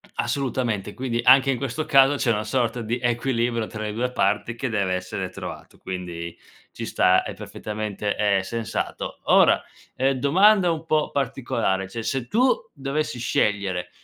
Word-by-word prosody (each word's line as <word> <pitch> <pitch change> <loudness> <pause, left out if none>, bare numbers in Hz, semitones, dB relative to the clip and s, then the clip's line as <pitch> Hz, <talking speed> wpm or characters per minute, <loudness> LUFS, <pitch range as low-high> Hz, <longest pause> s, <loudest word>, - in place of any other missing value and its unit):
Assolutamente. 120 -7 -2
Quindi, 125 -2 -2
anche 130 +2 +6
in 135 - 0
questo 140 +4 -3
caso 135 0 +5
c'è 125 -3 +1
una 105 0 -1
sorta 120 +1 -1
di 115 +3 -2
equilibrio 120 -1 0
tra 110 0 -7
le 105 -1 -3
due 120 +4 -1
parti 105 +2 0
che 130 +3 -3
deve 100 -5 0
essere 90 0 -4
trovato, - - -9
quindi 85 -2 -6 0.4
ci - - -6
sta, 90 0 +3
è - - -6
perfettamente, 105 -1 -4
ehm, 100 -2 +2
sensato. 115 +4 -4
Ora, - - +5 0.3
ehm, 135 +1 +2
domanda 185 +7 +5
un 165 -1 -3
pò 155 -2 +1
particolare: 115 -8 -1
cioè, 115 +4 -5
se 130 +1 -2
tu 250 - +3 0.2
dovessi 140 -1 -3
scegliere, 100 -6 0
115 Hz, 160 wpm, -24 LUFS, 105-135 Hz, 0.4 s, anche